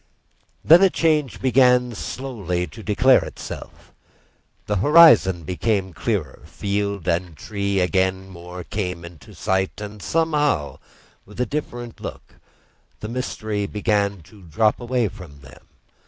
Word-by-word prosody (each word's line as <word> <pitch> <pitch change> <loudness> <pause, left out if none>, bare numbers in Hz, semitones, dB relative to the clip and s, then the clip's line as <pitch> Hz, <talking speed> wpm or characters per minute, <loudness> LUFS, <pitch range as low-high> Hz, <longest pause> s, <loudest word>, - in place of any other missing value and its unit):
Then 165 +4 +8
a 195 - +6
change 155 -7 0
began 125 -1 +3
slowly 100 -7 -4
to 110 - -12
declare 120 +5 +4
itself. - - -9 0.7
The 105 - -1
horizon 110 - +6
became 95 +2 -1
clearer, 90 - -3
field 100 -2 -3
and 85 -2 -1
tree 100 0 -1
came 95 0 0
more 90 -1 -10
into 85 -6 -6
sight, 95 +1 -1
and 105 0 -8
somehow 150 - 0 0.4
with 105 +3 -15
a 125 - +2
different 120 -3 -5
look; - - -9 0.6
the 105 - -6
mystery 110 -4 -3
began 100 -2 0
to 100 +6 -18
drop 95 +6 +1
away 120 -1 0
from 90 -8 -12
them. 65 0 -16
105 Hz, 125 wpm, -22 LUFS, 90-125 Hz, 0.7 s, Then